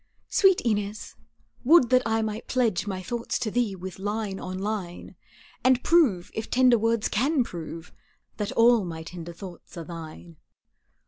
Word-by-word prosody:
Sweet 385 Hz, -2 st, +4 dB
Inez, 210 Hz, -2 st, -2 dB, 0.5 s
would 260 Hz, -3 st, +5 dB
that 255 Hz, 0 st, +6 dB
I 225 Hz, 0 st, +1 dB
might 215 Hz, 0 st, -4 dB
pledge 230 Hz, -7 st, 0 dB
My 190 Hz, -2 st, -4 dB
thoughts 235 Hz, +5 st, -3 dB
to 225 Hz, -4 st, -3 dB
thee 235 Hz, -4 st, 0 dB
with 185 Hz, 0 st, -8 dB
line 205 Hz, -1 st, -3 dB
on 185 Hz, 0 st, -5 dB
line, 195 Hz, -3 st, -5 dB, 0.5 s
And 255 Hz, -1 st, +3 dB
prove, 265 Hz, -, +3 dB
if 220 Hz, 0 st, -5 dB
tender 250 Hz, -2 st, +4 dB
words 225 Hz, 0 st, +1 dB
can 270 Hz, +5 st, +1 dB
prove, 165 Hz, -3 st, -8 dB, 0.4 s
That 210 Hz, -2 st, -3 dB
all 230 Hz, -1 st, +5 dB
my 165 Hz, -2 st, -6 dB
tender 170 Hz, 0 st, -8 dB
thoughts 180 Hz, 0 st, -11 dB
are 170 Hz, -, -5 dB
thine. 165 Hz, 0 st, -10 dB
210 Hz, 155 wpm, -26 LUFS, 180-240 Hz, 0.5 s, that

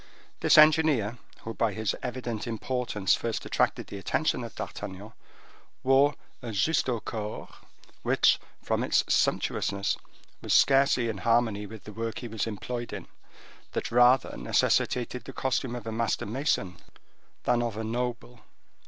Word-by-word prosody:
This -, -, +4 dB
engineer, 155 Hz, -8 st, +5 dB, 0.2 s
who 115 Hz, -, -6 dB
by 110 Hz, 0 st, 0 dB
his 110 Hz, -2 st, -1 dB
evident 120 Hz, -3 st, -4 dB
importance 115 Hz, -4 st, -1 dB
first -, -, -2 dB
attracted -, -, 0 dB
the 100 Hz, -, -8 dB
attention 95 Hz, -, 0 dB
of -, -, -8 dB
D'Artagnan, 100 Hz, +4 st, -7 dB, 0.7 s
wore 135 Hz, +2 st, +4 dB, 0.3 s
a 120 Hz, -, -8 dB
justaucorps, 110 Hz, -2 st, -1 dB, 0.5 s
which, -, -, +3 dB, 0.2 s
from -, -, 0 dB
its -, -, +3 dB
sumptuousness, 100 Hz, 0 st, +1 dB, 0.4 s
was -, -, -1 dB
scarcely 135 Hz, -3 st, +4 dB
in 105 Hz, -4 st, -3 dB
harmony 115 Hz, -2 st, +1 dB
with 110 Hz, 0 st, -11 dB
the 105 Hz, -, -10 dB
work 115 Hz, +1 st, -4 dB
he 120 Hz, -, -5 dB
was 110 Hz, -1 st, -3 dB
employed 120 Hz, +3 st, -5 dB
in, -, -, -7 dB, 0.7 s
that -, -, -3 dB
rather 125 Hz, +2 st, +4 dB
necessitated 120 Hz, -, +1 dB
the 135 Hz, -, -8 dB
costume 130 Hz, -1 st, -1 dB
of 120 Hz, -3 st, -7 dB
a 115 Hz, -, -4 dB
master 115 Hz, 0 st, -1 dB
mason 105 Hz, -, -1 dB, 0.7 s
than 120 Hz, -, +2 dB
of 115 Hz, -3 st, -3 dB
a 110 Hz, -, -3 dB
noble. 120 Hz, +1 st, -3 dB
115 Hz, 140 wpm, -28 LUFS, 105-125 Hz, 0.7 s, engineer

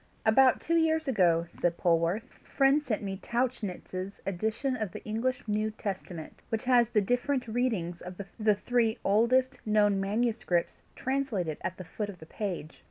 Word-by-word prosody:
"About 255 Hz, +4 st, +5 dB
two 335 Hz, +1 st, +1 dB
years 320 Hz, -1 st, +2 dB
ago," 175 Hz, -9 st, +3 dB, 0.2 s
said 175 Hz, -1 st, +1 dB
Polwarth, 170 Hz, +5 st, +2 dB
"a 260 Hz, -, -25 dB
friend 275 Hz, +2 st, +4 dB
sent 225 Hz, -8 st, -2 dB
me 195 Hz, -1 st, -3 dB
Tauchnitz's 200 Hz, -5 st, -3 dB
edition 220 Hz, +8 st, -1 dB
of 215 Hz, -6 st, -3 dB
the -, -, -8 dB
English 245 Hz, +3 st, -2 dB
New 215 Hz, +1 st, +1 dB
Testament, 190 Hz, -6 st, -6 dB
which 225 Hz, -1 st, -1 dB
has 245 Hz, -2 st, +4 dB
the 210 Hz, -, +3 dB
different 245 Hz, +5 st, 0 dB
readings 220 Hz, -8 st, -1 dB
of 180 Hz, +1 st, -9 dB, 0.2 s
the 215 Hz, -1 st, +4 dB
three 230 Hz, +1 st, +1 dB
oldest 245 Hz, +6 st, +3 dB
known 210 Hz, -2 st, +3 dB
manuscripts 215 Hz, -3 st, 0 dB, 0.2 s
translated 250 Hz, -, -1 dB
at 185 Hz, -, -3 dB
the 185 Hz, -, -7 dB
foot 205 Hz, +5 st, -4 dB
of 195 Hz, -, -8 dB
the 160 Hz, -, -12 dB
page. 175 Hz, -3 st, -5 dB
215 Hz, 165 wpm, -29 LUFS, 185-245 Hz, 0.2 s, About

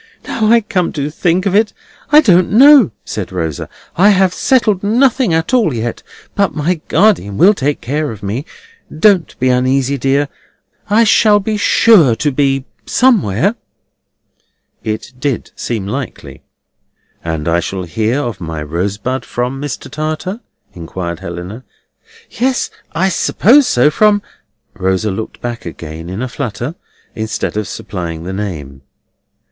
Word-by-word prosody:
"Now 220 Hz, -, 0 dB
I 230 Hz, +1 st, +5 dB
come 185 Hz, -4 st, -1 dB
to 145 Hz, 0 st, -3 dB
think 175 Hz, +4 st, 0 dB
of 195 Hz, -, 0 dB
it, 215 Hz, +1 st, +2 dB, 0.4 s
I 300 Hz, +1 st, +8 dB
don't 180 Hz, -, +4 dB
know," 270 Hz, +2 st, +7 dB, 0.2 s
said 100 Hz, -4 st, -5 dB
Rosa. 80 Hz, -5 st, -4 dB, 0.3 s
"I 195 Hz, +4 st, +5 dB
have 190 Hz, -2 st, +3 dB
settled 215 Hz, -7 st, +2 dB
nothing 245 Hz, +1 st, +2 dB
at 160 Hz, +7 st, 0 dB
all 220 Hz, -, +3 dB
yet, 115 Hz, +1 st, -3 dB, 0.3 s
but 200 Hz, -2 st, 0 dB
my 160 Hz, +2 st, -1 dB
guardian 170 Hz, -, +2 dB
will 200 Hz, +4 st, +6 dB
take 145 Hz, -6 st, -2 dB
care 145 Hz, +5 st, -2 dB
of 105 Hz, -2 st, -9 dB
me. 105 Hz, +7 st, -3 dB, 0.5 s
Don't 180 Hz, +1 st, +2 dB
be 130 Hz, -, +2 dB
uneasy, 130 Hz, +2 st, +1 dB
dear. 140 Hz, +3 st, +1 dB, 0.6 s
I 215 Hz, +3 st, +4 dB
shall 210 Hz, -1 st, +4 dB
be 215 Hz, +2 st, -2 dB
sure 205 Hz, -, +5 dB
to 145 Hz, +5 st, 0 dB
be 135 Hz, -1 st, 0 dB, 0.2 s
somewhere." 200 Hz, -, +2 dB, 1.3 s
(It 110 Hz, +3 st, -4 dB
did 135 Hz, -3 st, -2 dB
seem 110 Hz, -5 st, -3 dB
likely.) 130 Hz, +6 st, -6 dB, 0.8 s
"And 80 Hz, -2 st, -3 dB
I 85 Hz, +1 st, +2 dB
shall 95 Hz, +2 st, -4 dB
hear 110 Hz, -, -1 dB
of 115 Hz, -8 st, -5 dB
my 80 Hz, -2 st, -5 dB
Rosebud 100 Hz, -, -3 dB
from 125 Hz, +3 st, -3 dB
Mr. 145 Hz, -3 st, -5 dB
Tartar?" 155 Hz, +7 st, -4 dB, 0.3 s
inquired 85 Hz, 0 st, -6 dB
Helena. 90 Hz, +8 st, -7 dB, 0.7 s
"Yes, 255 Hz, +1 st, -1 dB, 0.2 s
I 190 Hz, +3 st, +1 dB
suppose 245 Hz, -, +4 dB
so; 135 Hz, -, +3 dB
from—" 205 Hz, +4 st, +3 dB, 0.5 s
Rosa 95 Hz, +1 st, -1 dB
looked 110 Hz, +3 st, -6 dB
back 120 Hz, -1 st, -5 dB
again 80 Hz, 0 st, -8 dB
in 95 Hz, +7 st, -4 dB
a -, -, -2 dB
flutter, 125 Hz, +1 st, -4 dB, 0.4 s
instead 110 Hz, -1 st, -3 dB
of 105 Hz, -1 st, -2 dB
supplying 85 Hz, -4 st, -6 dB
the 95 Hz, +2 st, -5 dB
name. 75 Hz, -10 st, -6 dB
135 Hz, 145 wpm, -15 LUFS, -, 1.3 s, I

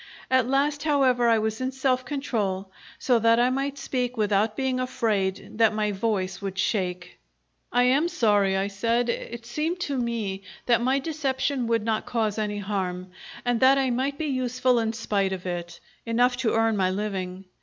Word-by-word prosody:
At 260 Hz, -2 st, +4 dB
last, 285 Hz, +2 st, +1 dB
however, 265 Hz, -5 st, +3 dB
I 230 Hz, -, +5 dB
was 220 Hz, +2 st, -2 dB
in 260 Hz, 0 st, -1 dB
self 260 Hz, -1 st, 0 dB
control, 210 Hz, -9 st, -2 dB, 0.3 s
so 245 Hz, -3 st, +2 dB
that 230 Hz, +1 st, +4 dB
I 245 Hz, +1 st, +3 dB
might 275 Hz, +2 st, -2 dB
speak 250 Hz, -3 st, -2 dB
without 210 Hz, 0 st, +1 dB
being 265 Hz, -1 st, 0 dB
afraid 215 Hz, -6 st, -1 dB
that 220 Hz, -1 st, +4 dB
my 210 Hz, -1 st, 0 dB
voice 195 Hz, -3 st, -2 dB
would 195 Hz, -1 st, -5 dB
shake. 180 Hz, -2 st, -2 dB, 0.5 s
"I 245 Hz, -, +3 dB
am 270 Hz, +6 st, +3 dB
sorry," 205 Hz, -, +2 dB
I 195 Hz, -, +1 dB
said. 230 Hz, +4 st, 0 dB
"It 235 Hz, 0 st, -4 dB
seemed 310 Hz, +9 st, -2 dB
to 285 Hz, -5 st, -2 dB
me 225 Hz, -5 st, -2 dB, 0.2 s
that 235 Hz, -1 st, +3 dB
my 260 Hz, +3 st, +2 dB
deception 275 Hz, -3 st, -1 dB
would 230 Hz, -2 st, +1 dB
not 220 Hz, -1 st, -1 dB
cause 220 Hz, -3 st, -1 dB
any 210 Hz, -1 st, -2 dB
harm, 185 Hz, -3 st, -3 dB, 0.3 s
and 245 Hz, -1 st, +1 dB
that 265 Hz, +2 st, +6 dB
I 265 Hz, -2 st, +1 dB
might 270 Hz, +3 st, -1 dB
be 315 Hz, -, -2 dB
useful 255 Hz, -2 st, +1 dB
in 225 Hz, -1 st, -1 dB
spite 200 Hz, -4 st, -1 dB
of 185 Hz, -1 st, -6 dB
it 175 Hz, -1 st, -5 dB, 0.2 s
enough 245 Hz, +2 st, +2 dB
to 245 Hz, -4 st, 0 dB
earn 225 Hz, -1 st, +2 dB
my 190 Hz, -2 st, +2 dB
living. 190 Hz, -1 st, -4 dB
230 Hz, 180 wpm, -25 LUFS, 200-255 Hz, 0.5 s, that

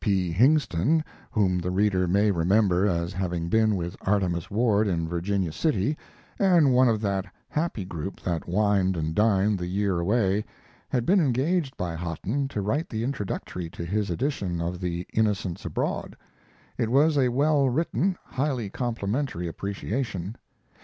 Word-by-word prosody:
P. 95 Hz, -5 st, +1 dB
Hingston, 130 Hz, -, +3 dB, 0.3 s
whom 95 Hz, -4 st, +1 dB
the 90 Hz, +1 st, -2 dB
reader 95 Hz, -1 st, +2 dB
may 100 Hz, +4 st, +3 dB
remember 95 Hz, +2 st, +3 dB
as 85 Hz, -2 st, -1 dB
having 90 Hz, -3 st, -2 dB
been 110 Hz, +1 st, +3 dB
with 85 Hz, -2 st, -3 dB
Artemus 95 Hz, -4 st, 0 dB
Ward 110 Hz, -1 st, +2 dB
in 85 Hz, -4 st, 0 dB
Virginia 90 Hz, +1 st, -1 dB
City, 130 Hz, -, 0 dB, 0.4 s
and 175 Hz, -9 st, +5 dB
one 125 Hz, 0 st, +5 dB
of 110 Hz, -2 st, 0 dB
that 100 Hz, -2 st, -1 dB, 0.2 s
happy 150 Hz, -, -2 dB
group 85 Hz, +1 st, -6 dB
that 85 Hz, -3 st, -3 dB
wined 95 Hz, -1 st, +2 dB
and 80 Hz, 0 st, -2 dB
dined 105 Hz, 0 st, +2 dB
the 90 Hz, -, -3 dB
year 95 Hz, -1 st, 0 dB
away, 100 Hz, +2 st, +1 dB, 0.5 s
had 120 Hz, -2 st, 0 dB
been 195 Hz, +2 st, +4 dB
engaged 145 Hz, +1 st, +1 dB
by 90 Hz, -2 st, -3 dB
Hotten 90 Hz, -, -2 dB
to 110 Hz, -6 st, -3 dB
write 145 Hz, -, -1 dB
the 110 Hz, 0 st, -3 dB
introductory 105 Hz, -8 st, -4 dB
to 85 Hz, 0 st, -7 dB
his 100 Hz, +3 st, -1 dB
edition 90 Hz, -, -2 dB
of 85 Hz, +2 st, -3 dB
The 90 Hz, 0 st, -3 dB
Innocents 100 Hz, -5 st, 0 dB
Abroad. -, -, -3 dB, 0.6 s
It 110 Hz, -, +1 dB
was 145 Hz, +5 st, +4 dB
a 130 Hz, -3 st, +3 dB
well 140 Hz, +2 st, +3 dB
written, 170 Hz, +6 st, 0 dB
highly 130 Hz, -7 st, -2 dB
complimentary 115 Hz, -, -2 dB
appreciation. 100 Hz, +2 st, -4 dB
100 Hz, 155 wpm, -26 LUFS, 90-125 Hz, 0.6 s, and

